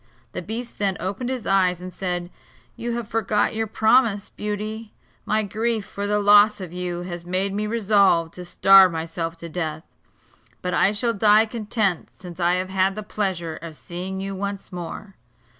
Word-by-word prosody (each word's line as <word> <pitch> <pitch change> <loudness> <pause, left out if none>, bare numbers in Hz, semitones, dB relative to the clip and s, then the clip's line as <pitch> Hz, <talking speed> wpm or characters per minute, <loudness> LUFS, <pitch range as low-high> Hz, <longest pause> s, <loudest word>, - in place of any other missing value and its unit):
The - - -5
beast 235 +2 -6
then 195 -3 0
opened 205 +7 -3
his 255 -4 -4
eyes, 185 -2 +2
and 180 0 -8
said: 180 -2 -3 0.4
"You 235 0 -4
have 235 -2 -4
forgot 215 -2 0
your 225 0 -1
promise, 220 -1 +2
Beauty. 210 +1 -5 0.3
My 215 +1 +2
grief 220 +1 -1
for 200 0 -5
the 210 0 +1
loss 205 +1 +6
of 180 -3 -7
you 175 -1 -3
has 175 -1 -6
made 185 +3 -1
me 210 +1 -2
resolve 200 -7 +3
to 180 - -9
starve 190 +1 +6
myself 165 0 -4
to 170 - -8
death; 160 -2 -4 0.8
but 180 -1 -2
I 190 +3 +4
shall 230 +3 +2
die 215 +1 +5
content, 215 -5 -1
since 180 -1 -10
I 175 0 +3
have 185 +1 -1
had 190 0 +1
the 215 - -5
pleasure 185 -6 -3
of 165 -2 -9
seeing 180 +6 -6
you 195 0 -4
once 200 +1 -5
more." 180 +3 -7
195 Hz, 175 wpm, -23 LUFS, 180-215 Hz, 0.8 s, loss